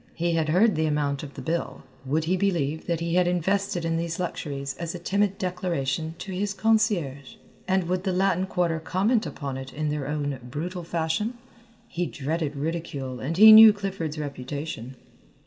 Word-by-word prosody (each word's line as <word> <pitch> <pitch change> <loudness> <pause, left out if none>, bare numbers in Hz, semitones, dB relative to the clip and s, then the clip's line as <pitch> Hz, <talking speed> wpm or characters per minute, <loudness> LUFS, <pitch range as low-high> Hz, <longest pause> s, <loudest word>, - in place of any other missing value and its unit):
He 170 +1 0
had 160 -2 0
heard 200 +7 +4
the 160 -1 0
amount 145 -2 0
of 145 -2 -9
the - - -7
bill. 165 +1 -3 0.2
Would 155 +4 +1
he 175 +4 +1
believe 165 -6 -1
that 170 -1 -1
he 170 0 -1
had 180 0 +3
invested 180 0 0
in 165 0 0
these 165 0 -3
luxuries 140 -6 -4
as 170 0 -4
a - - -3
timid 195 +3 0
declaration 165 -4 -2
to 195 - -7
his 195 +2 -2
concierge? 195 - 0 0.3
And 190 0 +2
would 180 +1 -2
the 190 - 0
Latin 190 0 +1
Quarter 175 -3 0
comment 200 +8 +1
upon 140 -3 -5
it 135 0 -7
in 155 0 -2
their 145 -2 -3
own 145 -2 -2
brutal 165 +9 -5
fashion? 170 +8 -1 0.5
He 175 -5 -2
dreaded 150 +1 -3
ridicule 140 -4 -4
and 155 +9 -3
he 220 +2 +10
knew 220 0 +11
Clifford's 190 -6 -4
reputation. 140 -2 -5
165 Hz, 180 wpm, -26 LUFS, 150-185 Hz, 0.5 s, knew